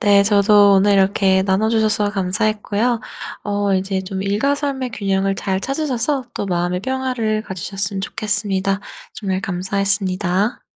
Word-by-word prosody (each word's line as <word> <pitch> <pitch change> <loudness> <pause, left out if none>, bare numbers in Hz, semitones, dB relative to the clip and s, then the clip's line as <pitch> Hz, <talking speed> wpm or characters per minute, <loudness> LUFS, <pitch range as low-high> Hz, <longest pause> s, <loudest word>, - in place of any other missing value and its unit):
네. 205 -3 +5
저도 205 0 +5
오늘 200 +1 +4
이렇게 190 -1 +3
나눠 195 +3 +1
주셔서 220 -2 +1
감사했고요. 210 +3 0 0.4
어 205 -1 0
이제 190 0 -1
좀 190 0 -5
일과 210 +9 +1
삶의 275 -3 -3
균형을 195 -1 0
잘 190 -1 -2
찾으셔서 270 +1 -1
또 - - -4
마음의 175 0 -1
평화를 250 -3 -1
가지셨으면 195 +1 -4
좋겠습니다. 195 -1 -1 0.3
정말 190 -3 -3
감사했습니다. 190 +1 0
200 Hz, 330 characters per minute, -19 LUFS, 190-220 Hz, 0.4 s, 네